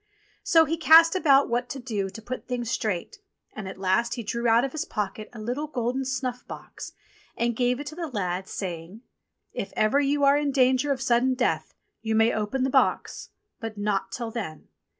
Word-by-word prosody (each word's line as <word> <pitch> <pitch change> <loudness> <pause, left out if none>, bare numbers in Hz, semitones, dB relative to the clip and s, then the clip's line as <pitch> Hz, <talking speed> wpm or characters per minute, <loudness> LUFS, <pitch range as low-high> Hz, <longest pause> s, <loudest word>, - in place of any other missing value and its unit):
So 325 -1 +5
he 330 +2 -2
cast 330 +1 +7
about 280 -6 +4
what 245 +1 -1
to 270 - -5
do 215 -6 -3
to 225 - -10
put 255 +3 -6
things 240 -2 -3
straight, 215 - -3 0.3
and 215 -3 -7
at 190 - -7
last 195 +5 +1
he 235 - -5
drew 235 +2 -2
out 230 +3 +4
of 270 - -4
his 315 - -3
pocket 210 0 -4
a 240 - -10
little 250 +8 -3
golden 255 -1 -2
snuff 255 -1 -3
box, - - -9 0.4
and 235 0 0
gave 245 +1 +1
it 290 - -6
to 300 +2 -7
the 340 -1 -4
lad 190 -7 -3
saying: 180 +4 -6 0.5
"If 195 - -4
ever 215 +6 +3
you 285 0 +1
are 280 +1 +5
in 290 -1 0
danger 260 +1 +3
of 265 -1 -1
sudden 255 +1 +2
death 250 -1 -1 0.3
you 220 -1 -1
may 225 +1 +4
open 220 +5 -1
the 265 - 0
box; - - +1 0.3
but 225 -2 -6
not 205 -2 -1
till 235 -2 -4
then. 200 -10 -6
240 Hz, 200 wpm, -26 LUFS, 215-270 Hz, 0.5 s, cast